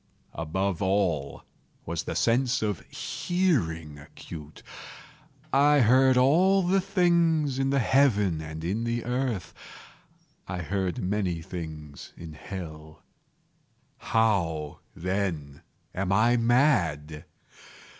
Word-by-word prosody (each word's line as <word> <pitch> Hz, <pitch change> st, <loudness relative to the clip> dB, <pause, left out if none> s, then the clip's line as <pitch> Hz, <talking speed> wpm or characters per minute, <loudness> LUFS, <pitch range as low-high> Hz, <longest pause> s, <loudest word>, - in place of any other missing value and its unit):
Above 90 Hz, +4 st, -2 dB
all 95 Hz, -8 st, 0 dB, 0.4 s
was -, -, -3 dB
the -, -, -4 dB
sense 125 Hz, +1 st, +1 dB
of 105 Hz, -5 st, -1 dB
hearing 80 Hz, -, -1 dB
acute. 75 Hz, 0 st, -11 dB, 0.9 s
I 145 Hz, +1 st, +5 dB
heard 130 Hz, +2 st, +5 dB
all 185 Hz, +8 st, +4 dB
things 170 Hz, -7 st, +2 dB
in 135 Hz, 0 st, +1 dB
the 140 Hz, -, +1 dB
heaven 105 Hz, -, +2 dB
and 80 Hz, 0 st, -7 dB
in 100 Hz, +7 st, -2 dB
the 115 Hz, 0 st, -2 dB
earth. 125 Hz, -5 st, -2 dB, 0.9 s
I 90 Hz, -1 st, -4 dB
heard 95 Hz, +1 st, -2 dB
many 90 Hz, -4 st, -1 dB
things 80 Hz, -5 st, -8 dB
in 80 Hz, -2 st, -9 dB
hell. 80 Hz, -2 st, -9 dB, 1.0 s
How, 85 Hz, -9 st, 0 dB, 0.2 s
then, 85 Hz, -6 st, -3 dB, 0.3 s
am 95 Hz, 0 st, -2 dB
I 110 Hz, +5 st, +4 dB
mad? 105 Hz, -, +1 dB
100 Hz, 100 wpm, -27 LUFS, 80-130 Hz, 1.0 s, I